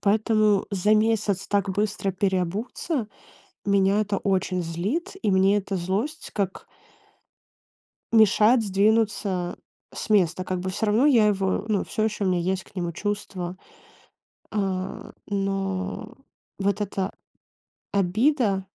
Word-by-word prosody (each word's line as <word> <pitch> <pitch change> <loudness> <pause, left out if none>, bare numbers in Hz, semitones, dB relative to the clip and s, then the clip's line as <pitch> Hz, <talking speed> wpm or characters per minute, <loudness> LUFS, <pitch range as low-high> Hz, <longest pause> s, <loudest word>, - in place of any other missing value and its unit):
Поэтому 215 -1 +2
за 205 +2 +3
месяц 215 -3 +1
так 200 -1 0
быстро 200 0 -1
переобуться 200 - -1 0.6
меня 200 +1 +3
это 205 -1 -1
очень 185 -2 0
злит, 200 - -2
и - - +1
мне 195 +1 +4
эта 195 -1 -3
злость 195 - -3
как 195 -2 -3 1.5
мешает 220 +2 +5
сдвинуться 200 -3 +1 0.4
с - - -6
места. 185 -3 +3
Как 185 0 -2
бы 185 +1 -3
всё 210 +4 -1
равно 220 +7 +3
я 235 -7 +5
его 195 -1 0
ну, 210 -3 +1
всё 215 - -1
ещё 210 -2 -1
у - - +2
меня 180 -1 +1
есть 190 +2 -1
к - - -21
нему 175 -2 -2
чувства. 185 -2 -4 1.0
А, 195 -2 -3 0.2
но 195 +2 -2 0.5
вот 200 +1 0
эта 195 -1 -2 0.8
обида 200 +1 +2
200 Hz, 125 wpm, -25 LUFS, 190-215 Hz, 1.5 s, мешает